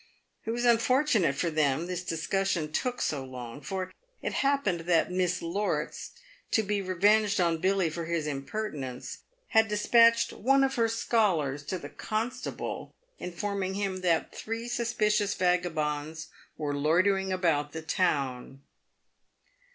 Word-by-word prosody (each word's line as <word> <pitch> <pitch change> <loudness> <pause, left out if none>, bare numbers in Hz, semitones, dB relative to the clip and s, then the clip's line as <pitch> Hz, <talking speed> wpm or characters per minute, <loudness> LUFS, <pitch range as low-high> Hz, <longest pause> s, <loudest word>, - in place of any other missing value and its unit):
It - - -4
was 240 +2 -1
unfortunate 235 - +3
for 170 +4 -1
them 155 0 +1
this 180 0 -4
discussion 170 -1 -1
took 245 +9 -1
so 140 -3 -1
long, 125 0 -8
for 185 +4 -4 0.3
it - - -2
happened 275 -11 +1
that 165 +1 +2
Miss 180 -2 0
Lorts, 195 +5 -2 0.4
to 220 - +2
be 205 0 -1
revenged 200 +3 +3
on 170 -2 +2
Billy 190 0 +2
for 165 +1 -4
his 165 -2 -1
im 140 -2 -3
pertinence, 140 -10 -5 0.3
had 220 0 +4
despatched 230 +2 +4
one 270 +3 +3
of 270 0 +1
her 230 -1 +2
scholars 190 - +1
to 185 - -2
the - - -8
constable, 230 +4 -4 0.2
in 180 - -5
forming 190 +1 -2
him 195 -2 -2
that 170 -3 +1
three 230 +1 -5
suspicious 210 -4 +1
vagabonds 160 -4 -1 0.3
were 150 -2 -2
loitering 185 +6 +2
about 165 -6 +1
the 160 +1 -6
town. 135 -6 -1
185 Hz, 140 wpm, -29 LUFS, 155-215 Hz, 0.4 s, had